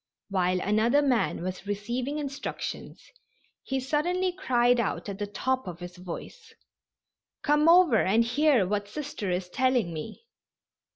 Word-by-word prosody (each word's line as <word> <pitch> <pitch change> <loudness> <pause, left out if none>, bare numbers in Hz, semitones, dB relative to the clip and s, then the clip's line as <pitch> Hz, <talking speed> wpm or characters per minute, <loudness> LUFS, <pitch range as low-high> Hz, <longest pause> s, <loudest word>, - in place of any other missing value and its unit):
While 185 -2 +1
another 225 +9 +3
man 250 -9 +1
was 185 +2 -5
receiving 240 +8 -3
instructions 280 -2 -6 0.5
he 270 -1 -2
suddenly 345 +8 0
cried 245 -9 +2
out 225 - -2
at 200 0 -6
the 205 - -2
top 260 +4 -2
of 175 -1 -7
his 175 0 -9
voice: 185 - -9 0.9
"Come 300 +2 +4
over 340 -10 +6
and 215 +5 +3
hear 250 -3 +3
what 205 +1 -1
Sister 265 -4 -5
is 180 0 -1
telling 245 -3 +1
me." 215 - -8
240 Hz, 135 wpm, -27 LUFS, 195-290 Hz, 0.9 s, over